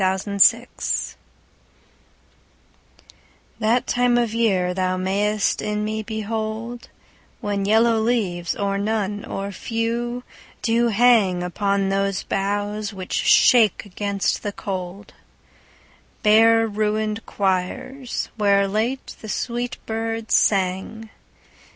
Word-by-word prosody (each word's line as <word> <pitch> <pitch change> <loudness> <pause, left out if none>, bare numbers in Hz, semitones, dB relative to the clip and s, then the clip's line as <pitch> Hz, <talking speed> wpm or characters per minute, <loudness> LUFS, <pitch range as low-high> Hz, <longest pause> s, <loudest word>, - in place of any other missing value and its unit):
LXXIII 200 +5 +3 2.9
That 230 +3 +2
time 245 0 +2
of 235 -2 0
year 190 -6 +1
thou 185 0 -1
mayst 200 +3 0
in 210 0 -2
me 215 0 -2
behold 220 +2 -4 0.5
When 205 -4 -2
yellow 225 +2 +3
leaves, 205 -7 -1
or 200 -1 -1
none, 205 -1 -2
or 200 +1 -5
few, 235 +3 -3 0.4
do 235 0 +2
hang 215 -5 +3
Upon 200 +2 0
those 195 -1 0
boughs 205 +2 -2
which 190 -2 -7
shake 220 -5 +4
against 200 0 -2
the 205 - -3
cold, 195 0 -6 1.1
Bare 225 +1 +5
ruin'd 215 0 -1
choirs, 195 +7 -2
where 200 -2 +3
late 225 +7 -2
the 215 - -8
sweet 240 +2 -3
birds 225 0 -3
sang. 195 +3 +1
210 Hz, 100 wpm, -22 LUFS, 195-225 Hz, 2.9 s, Bare